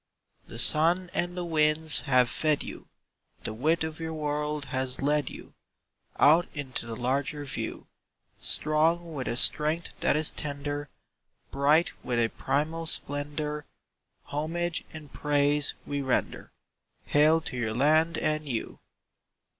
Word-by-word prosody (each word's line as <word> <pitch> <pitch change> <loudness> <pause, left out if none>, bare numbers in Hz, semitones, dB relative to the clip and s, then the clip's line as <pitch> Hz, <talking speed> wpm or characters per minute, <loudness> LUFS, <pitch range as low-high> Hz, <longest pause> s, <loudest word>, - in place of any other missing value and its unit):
The - - -8
sun 170 +8 +2
and 175 +1 -2
the 175 - -2
winds 155 -1 +3
have 125 -1 +5
fed 155 +3 +1
you; - - -9 0.6
The - - -3
width 155 +9 +1
of 160 0 -5
your 160 -1 -4
world 150 -1 -2
has 130 0 -1
led 145 0 +1
you - - -11 0.6
Out 160 +4 +5
into 130 -5 -4
the 115 - -5
larger 135 +4 -1
view; 135 - -5 0.5
Strong 165 +2 +1
with 130 -4 -4
a 120 - -1
strength 155 +5 +4
that - - +2
is 155 0 +2
tender, 145 0 -4 0.6
Bright 145 +5 +3
with 120 - -1
a 115 -1 +2
primal 160 +7 -2
splendour, 150 0 -2 0.6
Homage 165 +3 -3
and 150 -3 -11
praise 145 0 +2
we 145 0 -2
render— 130 -2 -2 0.5
Hail 155 +2 +4
to 155 - -5
your 110 -3 -2
land 155 +5 +3
and 155 -1 -1
you! 115 -3 -4
150 Hz, 135 wpm, -28 LUFS, 140-160 Hz, 0.6 s, have